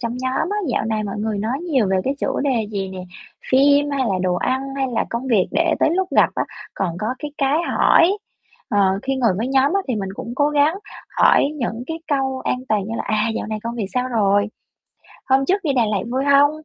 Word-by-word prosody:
trong 235 Hz, -1 st, -3 dB
nhóm 260 Hz, +5 st, -1 dB
á, 415 Hz, -, -1 dB
dạo 240 Hz, -, 0 dB
này 220 Hz, -1 st, -1 dB
mọi 200 Hz, 0 st, -5 dB
người 215 Hz, -1 st, -2 dB
nói 230 Hz, +6 st, -2 dB
nhiều 260 Hz, -7 st, +3 dB
về 190 Hz, -, +2 dB
cái 270 Hz, +2 st, 0 dB
chủ -, -, -1 dB
đề 250 Hz, -6 st, 0 dB
gì 195 Hz, -2 st, -3 dB
nè, 190 Hz, -, -8 dB, 0.5 s
phim 285 Hz, +2 st, +4 dB
hay 280 Hz, -1 st, -1 dB
là 195 Hz, -, 0 dB
đồ 180 Hz, -1 st, +1 dB
ăn 260 Hz, +8 st, 0 dB, 0.2 s
hay 270 Hz, -1 st, 0 dB
là -, -, 0 dB
công 235 Hz, +3 st, -3 dB
việc 220 Hz, -8 st, +2 dB
để 330 Hz, -1 st, +2 dB
tới -, -, +4 dB
lúc 375 Hz, 0 st, 0 dB
gặp -, -, +6 dB
á -, -, 0 dB, 0.3 s
còn 180 Hz, -4 st, -2 dB
có 210 Hz, -, -3 dB
cái 295 Hz, -, -6 dB
cái 275 Hz, +2 st, +2 dB
hỏi. 380 Hz, +5 st, +4 dB, 0.5 s
Ờ, 195 Hz, -3 st, +2 dB
khi 270 Hz, 0 st, -1 dB
ngồi 240 Hz, -4 st, +2 dB
với 225 Hz, +5 st, -2 dB
nhóm 270 Hz, +2 st, +3 dB
á 395 Hz, -, +3 dB
thì 250 Hz, -, 0 dB
mình 195 Hz, -2 st, -3 dB
cũng 230 Hz, -, -7 dB
cố 290 Hz, +1 st, +2 dB
gắng 295 Hz, +3 st, +3 dB, 0.4 s
hỏi -, -, +5 dB
những 235 Hz, -3 st, -3 dB
cái 325 Hz, 0 st, -4 dB
câu 265 Hz, -2 st, 0 dB
an 250 Hz, -, 0 dB
toàn 210 Hz, -2 st, +1 dB
như 225 Hz, -, -4 dB
là -, -, -2 dB
"À, 215 Hz, 0 st, +1 dB
dạo -, -, -3 dB
này 215 Hz, 0 st, -3 dB
công 235 Hz, +1 st, -4 dB
việc 215 Hz, -5 st, -3 dB
sao 250 Hz, 0 st, 0 dB
rồi? 205 Hz, -3 st, +2 dB, 0.8 s
Hôm 270 Hz, +1 st, +4 dB
trước 395 Hz, +5 st, +1 dB
đi 290 Hz, -, +1 dB
Đà 245 Hz, -, +3 dB
Lạt 210 Hz, -3 st, -1 dB
vui 265 Hz, +2 st, 0 dB
hông?" 280 Hz, +1 st, +5 dB
255 Hz, 240 wpm, -20 LUFS, 215-280 Hz, 0.8 s, gặp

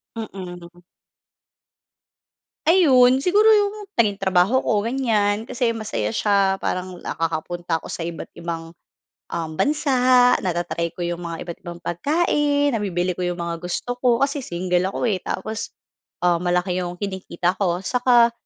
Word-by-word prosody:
Mm. 180 Hz, -5 st, -8 dB, 1.9 s
Ayon. 260 Hz, -8 st, +6 dB
Siguro 420 Hz, +4 st, +5 dB
'yong 415 Hz, -1 st, +4 dB, 0.2 s
naging 205 Hz, -3 st, +2 dB
trabaho 190 Hz, +7 st, +3 dB
ko 210 Hz, -1 st, 0 dB
ganyan 225 Hz, -4 st, 0 dB
kasi 235 Hz, -1 st, 0 dB
masaya 220 Hz, 0 st, -3 dB
siya 200 Hz, -3 st, +2 dB
parang 185 Hz, -1 st, -3 dB
nakakapunta 165 Hz, +1 st, -2 dB
ako -, -, -10 dB
sa 165 Hz, -, -4 dB
iba't 170 Hz, -1 st, -6 dB
ibang, 165 Hz, -1 st, -5 dB, 0.7 s
um, 165 Hz, -2 st, -3 dB
bansa 255 Hz, -4 st, +4 dB
nata-try 170 Hz, -2 st, -2 dB
ko 180 Hz, -, -6 dB
'yong 175 Hz, 0 st, -2 dB
mga 170 Hz, -2 st, -5 dB
iba't 170 Hz, -1 st, -7 dB
ibang 175 Hz, -2 st, -9 dB
pagkain 290 Hz, -, +1 dB
nabibili 185 Hz, -5 st, -1 dB
ko 180 Hz, -, -1 dB
'yong 175 Hz, -, -1 dB
mga 170 Hz, -1 st, -3 dB
gusto 180 Hz, +8 st, -4 dB
ko 245 Hz, 0 st, +2 dB
kasi 280 Hz, +1 st, +1 dB
single 180 Hz, +1 st, 0 dB
ako 240 Hz, -, 0 dB
eh 190 Hz, -, 0 dB
tapos, 215 Hz, +4 st, -5 dB, 0.5 s
ah, 175 Hz, -1 st, +3 dB
malaki 180 Hz, +1 st, 0 dB
'yong 180 Hz, -1 st, -3 dB
kinikita 185 Hz, -2 st, -2 dB
ko. 180 Hz, -2 st, 0 dB
Saka 240 Hz, +1 st, +4 dB
190 Hz, 140 wpm, -22 LUFS, 175-245 Hz, 1.9 s, Ayon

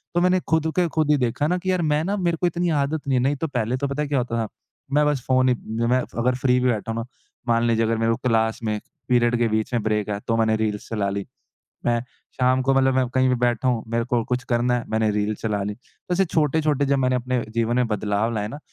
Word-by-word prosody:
तो 175 Hz, -, +3 dB
मैंने 180 Hz, +1 st, +3 dB
खुद 160 Hz, 0 st, +2 dB
को 175 Hz, -, +3 dB
खुद 155 Hz, -2 st, +2 dB
ही 150 Hz, -, +4 dB
देखा 130 Hz, +3 st, 0 dB
ना 180 Hz, +3 st, +1 dB
कि 185 Hz, +1 st, -1 dB
यार 185 Hz, -2 st, +1 dB
मैं 150 Hz, +1 st, +1 dB
ना 200 Hz, +4 st, -1 dB
मेरे 170 Hz, -3 st, 0 dB
को 180 Hz, -, +3 dB
इतनी 175 Hz, +1 st, -1 dB
आदत 150 Hz, +2 st, -2 dB
नहीं 135 Hz, -2 st, +2 dB
है -, -, 0 dB
नहीं 140 Hz, +2 st, +2 dB
तो 160 Hz, +3 st, -3 dB
पहले 125 Hz, -3 st, -1 dB
तो 140 Hz, -, -1 dB
पता 140 Hz, +2 st, -3 dB
है 150 Hz, -, -1 dB
क्या 145 Hz, -, +1 dB
होता 120 Hz, -1 st, -2 dB
था, -, -, -7 dB, 0.5 s
मैं 150 Hz, +1 st, +4 dB
बस 145 Hz, -3 st, 0 dB
फ़ोन 130 Hz, 0 st, +3 dB
ही 125 Hz, -, +3 dB, 0.3 s
मैं 125 Hz, +2 st, +3 dB, 0.2 s
अगर 125 Hz, +2 st, +2 dB
फ्री 125 Hz, 0 st, +2 dB
भी 125 Hz, 0 st, +2 dB
बैठा 115 Hz, -1 st, -1 dB
हूँ 115 Hz, -, -3 dB
ना, 115 Hz, -, -4 dB, 0.4 s
मान 115 Hz, 0 st, +2 dB
लीजिए 115 Hz, -1 st, +2 dB
अगर 115 Hz, 0 st, 0 dB
मेरे 115 Hz, 0 st, +1 dB
को 115 Hz, -, 0 dB
क्लास 110 Hz, -1 st, +1 dB
में 105 Hz, -1 st, -1 dB, 0.3 s
पीरियड 120 Hz, -1 st, +3 dB
के 120 Hz, -, +3 dB
बीच 110 Hz, +2 st, -1 dB
में 120 Hz, -, +1 dB
ब्रेक 105 Hz, -1 st, 0 dB
है 100 Hz, -1 st, -2 dB
तो 115 Hz, -, +1 dB
मैंने 110 Hz, -1 st, +2 dB
रील्स 105 Hz, -2 st, -2 dB
चला 105 Hz, -3 st, -1 dB
ली, 100 Hz, 0 st, -3 dB, 0.6 s
मैं 120 Hz, -1 st, +2 dB, 0.4 s
शाम 130 Hz, 0 st, +3 dB
को 135 Hz, +1 st, +2 dB
मतलब 135 Hz, 0 st, +3 dB
मैं 130 Hz, -1 st, +2 dB
कहीं 130 Hz, 0 st, +3 dB
भी 130 Hz, -, +3 dB
बैठा 120 Hz, +1 st, +1 dB
हूँ, 120 Hz, -3 st, +1 dB
मेरे 115 Hz, +1 st, 0 dB
को 120 Hz, -1 st, 0 dB
कुछ 125 Hz, +1 st, -2 dB
करना 120 Hz, +1 st, +2 dB
है, 120 Hz, -, -1 dB
मैंने 110 Hz, 0 st, +1 dB
रील 105 Hz, +1 st, 0 dB
चला 105 Hz, -1 st, -2 dB
ली, 105 Hz, +1 st, -4 dB, 0.4 s
ऐसे 190 Hz, +2 st, +3 dB
छोटे-छोटे 150 Hz, -3 st, +1 dB
जब 140 Hz, 0 st, +2 dB
मैंने 130 Hz, -1 st, +2 dB
अपने 125 Hz, 0 st, -1 dB
जीवन 115 Hz, +1 st, +1 dB
में 125 Hz, -1 st, +2 dB
बदलाव 105 Hz, +1 st, 0 dB
लाए 105 Hz, -1 st, -2 dB
ना, 145 Hz, -, -7 dB
125 Hz, 270 wpm, -23 LUFS, 115-140 Hz, 0.6 s, ही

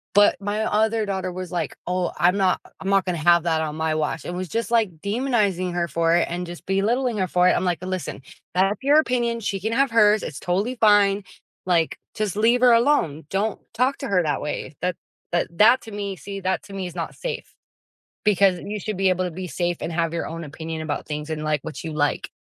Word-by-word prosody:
But 205 Hz, 0 st, +6 dB
my 205 Hz, +2 st, -1 dB
other 220 Hz, +1 st, +1 dB
daughter 190 Hz, -2 st, -2 dB
was 185 Hz, 0 st, -6 dB
like, 170 Hz, -5 st, -2 dB
"Oh, 180 Hz, 0 st, -1 dB
I'm 180 Hz, +2 st, +4 dB
not 190 Hz, -2 st, +2 dB, 0.2 s
I'm 195 Hz, -, -4 dB
not 195 Hz, -1 st, +3 dB
gonna 180 Hz, -2 st, -1 dB
have 170 Hz, +1 st, +5 dB
that 160 Hz, -2 st, +1 dB
on 155 Hz, -1 st, -3 dB
my 160 Hz, 0 st, 0 dB
watch," 155 Hz, -1 st, -2 dB
and 175 Hz, -, -4 dB
was 185 Hz, -1 st, -4 dB
just, 230 Hz, +3 st, -2 dB
like, 215 Hz, -8 st, +2 dB
demonizing 200 Hz, -5 st, 0 dB
her 175 Hz, -1 st, 0 dB
for 165 Hz, +2 st, +2 dB
it 175 Hz, -, +2 dB
and 175 Hz, +1 st, -4 dB
just 175 Hz, 0 st, -9 dB
belittling 225 Hz, +5 st, +1 dB
her 185 Hz, -, 0 dB
for 180 Hz, +1 st, +3 dB
it, -, -, +5 dB
I'm -, -, 0 dB
like, 180 Hz, 0 st, -1 dB
"Listen, 185 Hz, -6 st, -4 dB, 0.3 s
that's 195 Hz, +3 st, +2 dB
your 285 Hz, +3 st, +5 dB
opinion, 240 Hz, -5 st, 0 dB
she 200 Hz, -3 st, -2 dB
can 220 Hz, +4 st, -2 dB
have 270 Hz, +2 st, +2 dB
hers, 215 Hz, -2 st, +5 dB
it's 145 Hz, -, -6 dB
totally 200 Hz, +8 st, -1 dB
fine, 205 Hz, -3 st, +4 dB, 0.4 s
like, 170 Hz, -3 st, +1 dB, 0.2 s
just 210 Hz, -3 st, -2 dB
leave 235 Hz, +3 st, +3 dB
her 250 Hz, -1 st, +7 dB
alone. 230 Hz, -, +2 dB
Don't 205 Hz, +2 st, -1 dB
talk 255 Hz, +4 st, +1 dB
to 275 Hz, -, -4 dB
her 185 Hz, -3 st, +2 dB
that 150 Hz, -3 st, -1 dB
way." 150 Hz, 0 st, -4 dB
That 180 Hz, 0 st, 0 dB, 0.4 s
that 175 Hz, 0 st, +1 dB
that 235 Hz, +6 st, +6 dB
to 220 Hz, -, -10 dB
me, 200 Hz, -1 st, -4 dB
see, 195 Hz, +4 st, -7 dB
that 190 Hz, +1 st, -1 dB
to 200 Hz, -1 st, -12 dB
me 190 Hz, -2 st, -3 dB
is 175 Hz, -, -10 dB
not 165 Hz, -2 st, -4 dB
safe. -, -, -5 dB, 0.7 s
Because 195 Hz, -3 st, +4 dB
you 210 Hz, +3 st, -5 dB
should 215 Hz, +1 st, -4 dB
be 190 Hz, 0 st, +2 dB
able 185 Hz, 0 st, +1 dB
to 180 Hz, -, -2 dB
be 185 Hz, +3 st, -6 dB
safe 175 Hz, 0 st, -1 dB
and 170 Hz, -, -4 dB
have 165 Hz, 0 st, 0 dB
your 170 Hz, -, -2 dB
own 165 Hz, +1 st, -6 dB
opinion 160 Hz, +2 st, -6 dB
about 150 Hz, -2 st, -3 dB
things 150 Hz, +1 st, -5 dB
and 155 Hz, -1 st, -3 dB
like 155 Hz, -1 st, 0 dB
what 160 Hz, -, -7 dB
you 160 Hz, -, -4 dB
like, 145 Hz, -1 st, 0 dB
185 Hz, 235 wpm, -23 LUFS, 170-215 Hz, 0.7 s, her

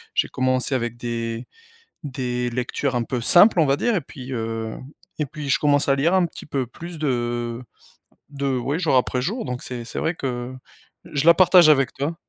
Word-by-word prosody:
j'ai -, -, +2 dB
commencé 130 Hz, +1 st, 0 dB
avec 120 Hz, -2 st, -2 dB
des 115 Hz, 0 st, -4 dB, 0.6 s
des 125 Hz, -4 st, -3 dB
lectures 125 Hz, +2 st, -2 dB
un 120 Hz, -, +1 dB
peu 125 Hz, +1 st, -3 dB
simples 175 Hz, -, +6 dB
on 155 Hz, -, +4 dB
va 140 Hz, 0 st, +2 dB
dire 235 Hz, +6 st, 0 dB
et 185 Hz, -, +1 dB
puis, 135 Hz, -3 st, -10 dB
heu 115 Hz, -2 st, -3 dB, 0.4 s
et 150 Hz, -, -1 dB
puis 145 Hz, +1 st, -6 dB
je -, -, +3 dB
commence 145 Hz, -1 st, +2 dB
à 135 Hz, -, +4 dB
lire 165 Hz, +7 st, +2 dB
un 185 Hz, -2 st, +4 dB
petit 165 Hz, -, -7 dB
peu 135 Hz, -3 st, -2 dB
plus 170 Hz, +7 st, -9 dB
de 120 Hz, -4 st, -2 dB, 0.7 s
de 140 Hz, -2 st, -2 dB
ouais, 140 Hz, +6 st, -2 dB
jour 160 Hz, -7 st, +1 dB
après 125 Hz, 0 st, +1 dB
jour 220 Hz, -, -2 dB
donc 125 Hz, -7 st, -5 dB
c'est 120 Hz, -2 st, -6 dB
c'est -, -, -6 dB
vrai 165 Hz, -, -1 dB
que 125 Hz, -3 st, -4 dB, 0.5 s
je 145 Hz, 0 st, -3 dB
la 170 Hz, -, +9 dB
partage 180 Hz, -2 st, +6 dB
avec 135 Hz, -4 st, +4 dB
toi. 145 Hz, +5 st, -3 dB
135 Hz, 200 wpm, -22 LUFS, 120-155 Hz, 0.7 s, la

